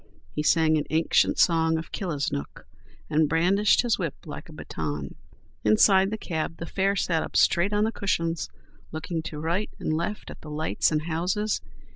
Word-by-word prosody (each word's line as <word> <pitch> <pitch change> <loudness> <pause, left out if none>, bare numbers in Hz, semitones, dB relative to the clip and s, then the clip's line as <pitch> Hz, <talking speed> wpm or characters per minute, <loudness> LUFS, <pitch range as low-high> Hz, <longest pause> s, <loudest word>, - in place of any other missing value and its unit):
He 150 - -1
sang 160 0 +3
an 150 - -3
ancient 160 +1 +2
song 160 -1 +3
of 160 - -6
Killisnook 145 - -3 0.4
and 155 -1 +2
brandished 190 +8 +3
his 235 -3 +1
whip 165 -6 -2
like - - -8
a - - -10
baton. 75 -2 -5 0.5
Inside 190 - +5
the 220 - -3
cab 165 -4 -3
the 165 - -5
fare 195 +3 0
sat 170 -4 +1
up - - -6
straight 175 +4 +3
on 205 0 +2
the 220 - +1
cushions, 165 -6 -1 0.4
looking 160 +1 -3
to 160 -1 -7
right 170 +7 -1
and 155 - -2
left 170 +6 -3
at - - -12
the 155 - -10
lights 155 +2 0
and 155 -1 0
houses. 180 +6 -1
165 Hz, 175 wpm, -26 LUFS, 155-190 Hz, 0.5 s, Inside